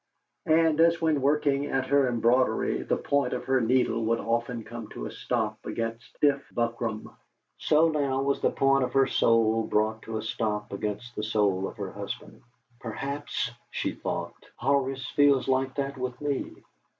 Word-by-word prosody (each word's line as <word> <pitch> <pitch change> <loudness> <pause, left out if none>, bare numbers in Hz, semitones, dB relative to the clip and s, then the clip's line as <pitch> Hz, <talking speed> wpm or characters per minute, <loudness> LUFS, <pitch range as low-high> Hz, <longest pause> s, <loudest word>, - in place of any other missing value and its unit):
And 160 -1 +4
as 170 0 +4
when 160 -2 +2
in - - -3
working 140 0 +2
at 135 -2 0
her 140 0 +3
embroidery 120 +2 +2
the - - 0
point 140 -3 0
of 125 - -3
her 130 -1 +2
needle 115 -1 +2
would 115 +1 +1
often 115 0 -1
come 115 -1 -8
to - - -7
a - - -5
stop - - -2
against 115 +1 -4
stiff 140 -1 +2
buckram, 115 -2 -3 0.4
so 155 +2 +4
now 140 -4 0
was 140 0 0
the - - +3
point 135 0 +3
of 125 - -3
her 135 0 +5
soul 115 -2 +3
brought 110 +1 +1
to 110 -1 -5
a 110 - -4
stop 105 -2 -2
against 105 +4 -4
the - - -2
soul 105 -3 +1
of - - -10
her - - -5
husband. - - -7 0.4
'Perhaps,' 135 +2 -3 0.2
she - - -2
thought, - - -4 0.2
'Horace 135 0 0
feels 145 -2 +4
like 130 0 +1
that 140 -1 -3
with 125 -1 -4
me.' 145 -2 -2
130 Hz, 175 wpm, -27 LUFS, 115-140 Hz, 0.4 s, her